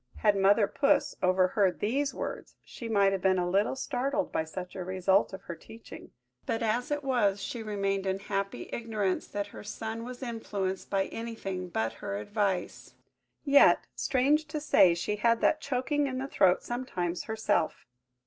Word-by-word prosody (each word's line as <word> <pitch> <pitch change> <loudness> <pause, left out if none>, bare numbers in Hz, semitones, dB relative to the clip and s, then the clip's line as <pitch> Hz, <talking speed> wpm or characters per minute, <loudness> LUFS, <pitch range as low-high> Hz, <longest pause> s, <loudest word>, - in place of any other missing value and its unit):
Had 210 -2 +3
Mother 200 +2 +4
Puss 275 - +1
overheard 185 +1 +2
these 275 +7 0
words, - - -6
she 235 - -8
might 200 -3 +4
have 195 -1 -2
been 190 0 +3
a 175 -1 0
little 200 +7 +1
startled 275 +2 -1
by - - 0
such 180 +3 -7
a 185 - -4
result 190 +2 +2
of 190 - -8
her 170 - -6
teaching: 220 +7 -12 0.4
but, 225 +1 -1
as 235 +5 0
it 290 0 -2
was, 225 -7 +2
she 235 +3 -5
remained 195 -2 -1
in 190 0 0
happy 195 -8 -3
ignorance 215 -5 -1
that 205 0 -3
her 205 - -11
son 220 +2 -5
was 250 +2 -7
influenced 200 -6 -3
by 195 -1 +1
anything 195 -6 -5
but 110 -8 -1
her 100 - -3
advice... 195 - -2 0.5
Yet, 280 0 +6
strange 290 +4 +2
to 300 +1 -3
say, 190 - +5
she 210 +5 -2
had 230 +2 +3
that 310 - +3
choking 280 +2 0
in 260 -1 -3
the 265 - -2
throat 190 -8 +3
sometimes 180 -9 -3
herself! 220 -7 -1
205 Hz, 170 wpm, -29 LUFS, 190-245 Hz, 0.5 s, Yet